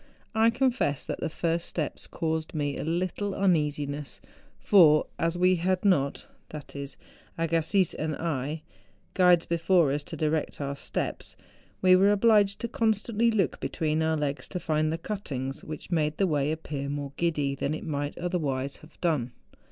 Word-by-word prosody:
I 220 +1 +4
confess 245 - 0
that - - -4
the - - -2
first 165 +1 -1
steps 155 -4 -4
caused 160 -1 -3
me 145 -2 -1
a - - -4
little 185 +4 -2
uneasiness; 150 -6 0 0.4
for, 160 -7 +6
as 165 +1 0
we 180 +1 +4
had 185 +3 0
not—that 150 -3 -2
is, 140 -1 -6 0.4
Agassiz 165 +3 +1
and 155 -1 -3
I—guides 155 - 0
before 170 -2 +3
us 145 +1 -1
to - - -7
direct 155 -1 -1
our 140 -1 -3
steps, - - -4 0.5
we 185 0 +7
were 195 +2 +5
obliged 205 0 +3
constantly 225 0 +1
to 220 - 0
look 190 - +1
between 155 -2 -1
our 160 0 +1
legs 145 -1 -2
to 180 - -4
find 155 -2 0
the 165 - -1
cuttings, 140 -9 -5
which 155 +3 -8
made 155 -2 +1
the 195 - +3
way 150 -4 +1
appear 150 -3 -4
more 140 -1 -4
giddy 150 -5 0
than 140 +2 -2
it - - -7
might 145 -2 -3
otherwise 140 -7 -2
have 155 - -18
done. 145 -9 0
160 Hz, 160 wpm, -27 LUFS, 145-185 Hz, 0.5 s, we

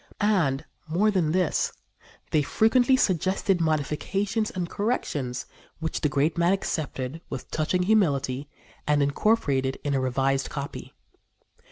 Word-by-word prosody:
And 175 -11 +2 0.2
more 190 +7 +2
than 175 -6 +1
this, 180 -2 +1 0.6
they 155 - +3
frequently 245 - +3
suggested 185 -2 +1
modifications 165 +8 0
and 180 -2 -3
corrections 145 - -2 0.3
which 160 -1 -3
the 150 - +2
great 150 +5 +1
man 170 +2 +4
accepted 155 -5 -3
with - - -7
touching 160 +4 0
humility 145 -9 +1 0.4
and 150 -1 +3
incorporated 140 -5 +1
in 145 - -1
a 135 - +2
revised 135 +1 0
copy. 140 -1 -6
160 Hz, 125 wpm, -26 LUFS, 140-195 Hz, 0.6 s, man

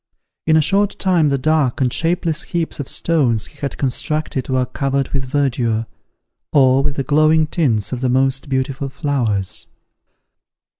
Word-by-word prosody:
In 160 0 +5
a - - +5
short 200 +5 +1
time 175 -6 +2
the 140 - +1
dark 150 -2 +1
and 125 -3 +1
shapeless 165 -1 0
heaps 170 -5 -3
of 140 - -4
stones 130 -10 +1
he 150 - -13
had 140 - -4
constructed 140 0 -2
were 130 -1 +1
covered 135 +1 -1
with 135 -2 -2
verdure, 125 -5 0 0.7
or 135 -2 +4
with 140 0 -2
the 135 - -1
glowing 155 +2 +3
tints 120 - 0
of 125 -1 -4
the 130 - +1
most 135 +2 +1
beautiful 135 +1 -2
flowers. 120 -9 -2
140 Hz, 155 wpm, -19 LUFS, 130-155 Hz, 0.7 s, In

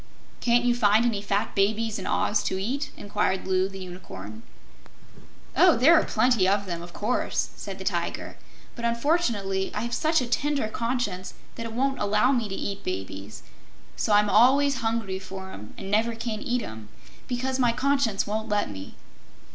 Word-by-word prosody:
"Can't 240 0 +3
you 245 - +4
find 220 -1 +4
any 220 -4 0
fat 205 +1 -1
babies 215 +2 +1
in 190 - -5
Oz 210 - +1
to 190 - -1
eat?" 270 +9 -2
inquired 205 -2 -1
Loo, 190 0 +2
the 195 - -9
Unicorn. 110 - -9 1.1
"There 265 +9 +6
are 320 - +6
plenty 245 -7 +3
of 200 +1 +2
them, 170 -2 -4
of 175 0 -9
course," 215 +7 -1
said - - -7
the - - -7
Tiger, - - -2 0.4
"but 235 - -8
unfortunately 235 - +1
I 210 - -1
have 235 +1 -3
such 320 +1 +2
a 255 - -1
tender 280 0 0
conscience 230 -6 -2 0.2
that 230 -1 -5
it 225 - -8
won't 270 +3 0
allow 210 +5 +3
me 235 -5 0
to 195 - -3
eat 200 0 -4
babies. 95 +2 -6 0.5
So 210 - -1
I'm 210 0 +5
always 275 +5 +5
hungry 225 -5 -1
for 190 0 -8
'em 105 +2 -10
and 195 - -6
never 225 +2 +2
can 225 -1 -3
eat 245 -3 -1
'em, 110 - -8 0.4
because 260 +1 -2
my 245 -2 +4
conscience 255 -4 +1
won't 220 +2 -3
let 205 - 0
me." 95 -1 -9
215 Hz, 175 wpm, -26 LUFS, 195-245 Hz, 1.1 s, There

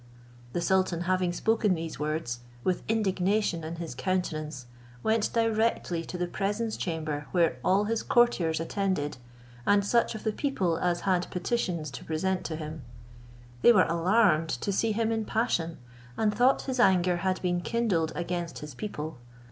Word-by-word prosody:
The 175 - -1
sultan 185 -1 +1
having 185 0 +1
spoken 215 +1 +2
these 165 -1 -5
words, 150 -6 -2 0.2
with 185 - 0
indignation 200 -4 +1
in 160 +1 -5
his 165 -4 -5
countenance, 155 -5 -2 0.4
went 220 -1 +1
directly 225 -6 +1
to 180 - -6
the 180 - 0
presence 210 +5 -2
chamber 155 -4 -3
where 165 -8 +2
all 195 +2 +3
his 225 +1 -1
courtiers 185 -10 +3
attended, 165 -4 -1 0.5
and 205 +4 +3
such 235 +1 +2
of 215 - -7
the 220 - +1
people 200 - 0
as 175 -1 0
had 185 -2 +1
petitions 180 - -2
to 135 - -8
present 180 +4 -1
to 160 - -3
him. 155 0 -6 0.8
They - - +8
were 195 -6 +6
alarmed 170 -1 +3
to 145 +10 -2
see 220 +3 +1
him 225 +1 0
in 225 -1 0
passion, 170 -8 -1 0.4
and 215 -1 +2
thought 250 +4 +4
his 260 -2 -3
anger 180 -5 +4
had 185 +1 0
been 175 -1 +1
kindled 185 -7 0
against 175 -1 -3
his 150 -1 -8
people. 155 - -5
180 Hz, 160 wpm, -28 LUFS, 165-215 Hz, 0.8 s, They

